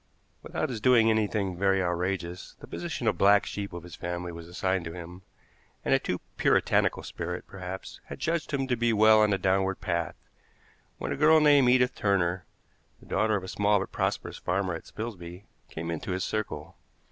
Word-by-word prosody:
Without - - -3
his 115 -4 -5
doing 115 -3 +5
anything 105 -3 0
very 95 +1 +2
outrageous, 90 0 -2
the - - -10
position 165 -8 -5
of 105 -6 +1
black 100 +1 +5
sheep 100 -1 -5
of 85 -2 -7
his 90 - -10
family 90 0 -4
was 85 0 -9
assigned 95 +1 -1
to 80 - -6
him, 90 +1 -9 0.6
and - - +3
a - - +5
too - - -3 0.2
puritanical - - +2
spirit, 85 +1 -5
perhaps, 95 -1 -8
had - - -8
judged 165 -1 -1
him 135 -2 0
to 130 -2 0
be 120 0 +1
well 110 0 +6
on 105 - +4
the 100 - +2
downward 95 0 +1
path, 85 -3 -2 0.8
when - - -4
a - - 0
girl 155 +2 +6
named 145 -4 +5
Edith 125 0 +4
Turner, 90 -3 0 0.5
the - - -18
daughter 110 0 +1
of 100 - -2
a - - -7
small 105 +2 +2
but 95 - -5
prosperous - - -2
farmer 95 0 -1
at 80 - -7
Spilsby, 95 -4 -7 0.2
came 85 +1 -5
into 85 +3 -3
his 90 0 -2
circle. 110 -1 -4
95 Hz, 190 wpm, -28 LUFS, 90-110 Hz, 0.8 s, well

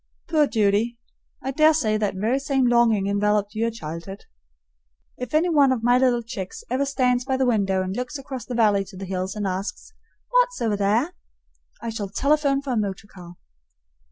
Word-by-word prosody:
Poor 305 -3 +3
Judy! 220 +1 +1 0.5
I 270 - -2
dare 310 +3 +4
say 220 -8 +1
that 210 -2 -1
very 225 +8 0
same 275 -2 +1
longing 235 -4 +3
enveloped 205 +1 +1
your 230 +1 0
childhood. 170 -2 -8 0.9
If 250 +3 -5
any 325 +3 +3
one 285 -5 +4
of 240 -3 -1
my 245 +1 +4
little 245 -2 +2
chicks 210 -6 -7
ever 265 +2 +1
stands 250 -3 +1
by 265 0 -1
the 265 - +2
window 195 -6 +1
and 185 +1 -4
looks 250 +4 -4
across 265 -2 -7
the 250 - -5
valley 210 -4 +3
to 190 0 -12
the 195 - -6
hills 185 +1 -3
and 210 -1 -3
asks, 195 - -4 0.4
"What's - - +2
over 220 -3 0
there?" 215 - +1 0.7
I 230 - -3
shall 210 -3 -4
telephone 280 +4 +1
for 275 - -3
a - - 0
motor 200 -2 -2
car. 175 -3 -13
230 Hz, 185 wpm, -23 LUFS, 200-265 Hz, 0.9 s, dare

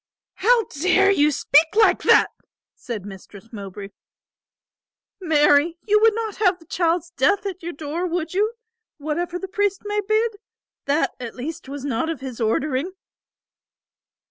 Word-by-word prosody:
"How 465 +3 +3
dare 370 +4 +2
you 300 -6 +3
speak 305 +4 +3
like 445 - +4
that?" - - +5 0.4
said 220 -6 -7
Mistress 200 +3 -12
Mowbray. 200 -1 -8 1.3
"Marry, 315 -1 +3
you 425 0 +4
would 445 0 +4
not 445 -2 -4
have 380 -4 +2
the 330 - -20
child's 335 0 -1
death 345 +7 +1
at 375 -2 -5
your 345 +1 -5
door, 315 +5 -4
would 335 -1 -3
you, 420 +4 +1 0.4
whatever 330 +4 -3
the 385 - -6
priest 405 0 -1
may 415 0 -1
bid? 435 +1 0 0.5
That 285 +3 +1
at 240 -2 -7
least 295 +3 -7
was 280 0 -6
not 285 +4 -1
of 325 -5 -4
his 255 -3 -7
ordering." 270 +9 -1
330 Hz, 145 wpm, -22 LUFS, 280-390 Hz, 1.3 s, that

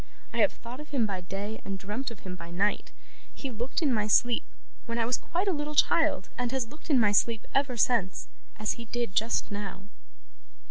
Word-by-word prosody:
I - - -3
have - - +5
thought 240 +3 -9
of 300 - -9
him 265 -6 +2
by 195 -3 -2
day, 200 +4 -5
and 195 0 -3
dreamt 210 +8 -3
of 230 -4 -11
him 185 -1 -6
by 170 -1 -9
night. 195 +4 0 0.4
He 270 - -4
looked 240 +7 -2
in 280 -4 +3
my 210 -2 +1
sleep, 240 +5 +4 0.4
when 230 0 -2
I 230 - +2
was 245 +2 +2
quite 355 +10 -2
a 385 - +3
little 300 -1 -3
child, 320 - +3
and 245 -1 0
has 260 -3 0
looked 305 +4 -13
in 275 -5 +5
my 210 -3 +5
sleep 225 +2 +3
ever 275 -3 +2
since, 215 -5 +2 0.3
as 215 -1 0
he - - -7
did 235 -3 -2
just 225 +2 +1
now. 200 -2 -5
230 Hz, 215 wpm, -29 LUFS, 205-265 Hz, 0.4 s, have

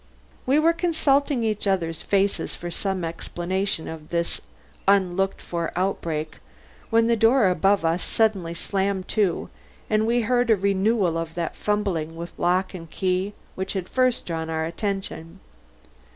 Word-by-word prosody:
We 270 +3 +4
were 325 +2 +4
consulting 290 -6 +2
each 215 -2 -1
other's 165 -4 0
faces 200 0 0
for 175 0 -6
some 190 0 -2
explanation 175 +2 -2
of 160 -1 -8
this 170 0 -1 0.5
unlooked 195 -1 +2
for 170 -1 -3
outbreak, 165 -4 -2 0.5
when 230 0 +4
the 235 0 +3
door 225 -1 +5
above 195 +1 +2
us 165 +2 +1
suddenly 195 -7 +1
slammed 195 +1 -1
to 200 -6 0 0.4
and 215 +1 +3
we 240 +1 +3
heard 245 +1 +1
a 220 - +7
renewal 195 -2 +1
of 165 -1 -5
that 170 -2 -2
fumbling 190 -7 -1
with 170 +1 -7
lock 185 +2 +1
and 165 -3 -8
key 185 +3 -1 0.2
which 190 +1 -4
had 190 -3 -3
first 255 -2 +1
drawn 160 -1 -3
our 160 0 -1
attention. 185 -1 -4
190 Hz, 150 wpm, -24 LUFS, 170-215 Hz, 0.5 s, a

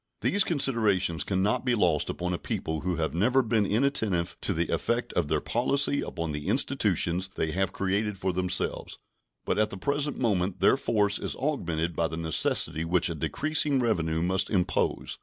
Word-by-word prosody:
These 200 - +3
considerations 105 - +1
can 95 -1 -1
not 105 +5 +1
be 125 -2 +1
lost 85 -8 +1
upon 90 0 -3
a 90 - -3
people 80 0 -3
who 90 -1 -1
have 80 -1 -2
never 125 +10 +2
been 110 -3 +1
inattentive 105 -7 0
to - - -1
the - - -1
effect - - -1
of - - 0
their - - +1
policy 140 +4 +1
upon 85 -2 -4
the 75 0 -5
institutions 90 +3 +1
they 80 - -1
have 95 +2 -1
created 100 +2 -1
for 95 0 -2
themselves, 90 0 -2 0.5
but - - 0
at 105 0 +2
the 95 - -7
present 140 +7 -1
moment 95 -6 0
their - - +5
force 105 -2 0
is - - -4
augmented 85 - -2
by 85 +1 +1
the 80 +1 -6
necessity 80 0 +1
which 85 +1 +2
a - - -2
decreasing 140 - 0
revenue 85 -10 0
must 95 +2 +1
impose. 90 -4 -1
95 Hz, 180 wpm, -27 LUFS, 85-115 Hz, 0.5 s, their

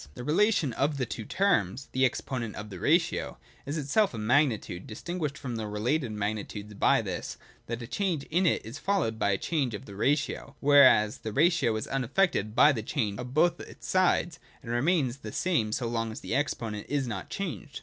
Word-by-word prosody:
This 125 - -7
relation 165 - +2
of 140 +4 0
the 130 - 0
two 110 -1 -6
terms 135 - +1
(the 130 0 +3
exponent 125 -4 -3
of 105 0 -7
the 95 - -7
ratio) 165 - +1 0.3
is 145 +3 -2
itself 150 - +1
a - - -5
magnitude, 110 - +1
distinguished 150 +5 -4
from 125 -5 -5
the 110 -1 -4
related 120 +5 -1
magni 105 0 -2
tudes 105 0 -9
by 100 - +3
this, - - -5 0.3
that 120 +1 -4
a - - -5
change 175 - -1
in 180 +3 +3
it - - +1
is 115 +7 -7
followed 165 - 0
by 100 - +2
a 95 - +2
change 135 - -1
of 100 - -8
the 100 - -10
ratio, 140 +8 -1
whereas 135 -7 +6
the 110 - -5
ratio 150 - +3
is 110 - -3
unaifected 135 - 0
by 150 - +7
the 120 -6 -2
change 110 -2 -2
of 125 +1 -7
both 175 +3 +3
its - - -10
sides, 180 -3 +2 0.2
and 115 - -6
remains 135 0 +1
the 110 -6 -8
same 150 -11 0
so 120 +2 -1
long 115 -1 -2
as 110 - -8
the - - -4
exponent 115 -7 -2
is 140 -2 0
not 105 -6 -5
changed. 170 -6 -5
130 Hz, 200 wpm, -28 LUFS, 110-155 Hz, 0.3 s, by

